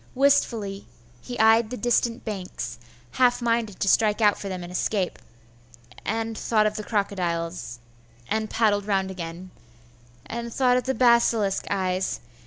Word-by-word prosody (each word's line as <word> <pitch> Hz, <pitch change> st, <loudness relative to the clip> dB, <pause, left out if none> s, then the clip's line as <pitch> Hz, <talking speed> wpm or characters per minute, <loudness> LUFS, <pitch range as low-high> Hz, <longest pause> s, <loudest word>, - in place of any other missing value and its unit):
Wistfully 235 Hz, -8 st, +1 dB, 0.4 s
be 245 Hz, -, -5 dB
eyed 220 Hz, 0 st, +5 dB
the 250 Hz, -, -5 dB
distant 240 Hz, 0 st, 0 dB
banks, 180 Hz, -, -5 dB, 0.3 s
half 245 Hz, -, +3 dB
minded 230 Hz, -4 st, -1 dB
to -, -, +1 dB
strike 210 Hz, +2 st, +3 dB
out 210 Hz, -2 st, +4 dB
for 200 Hz, -, -6 dB
them 185 Hz, -2 st, -5 dB
and 175 Hz, -, -8 dB
escape,.... 185 Hz, +1 st, -1 dB, 0.8 s
and 225 Hz, +1 st, -2 dB
thought 215 Hz, -1 st, +1 dB
of 215 Hz, 0 st, 0 dB
the 215 Hz, -, -4 dB
crocodiles,.... 175 Hz, -, -2 dB, 0.5 s
and 220 Hz, 0 st, -1 dB
paddled 210 Hz, -3 st, +1 dB
round 190 Hz, -2 st, 0 dB
again,.... 175 Hz, 0 st, -7 dB, 0.7 s
and 235 Hz, 0 st, -5 dB
thought 250 Hz, 0 st, +3 dB
of 250 Hz, -, -2 dB
the 265 Hz, -, 0 dB
basilisk 235 Hz, -4 st, +3 dB
eyes 185 Hz, -1 st, -1 dB
215 Hz, 145 wpm, -25 LUFS, 190-235 Hz, 0.8 s, eyed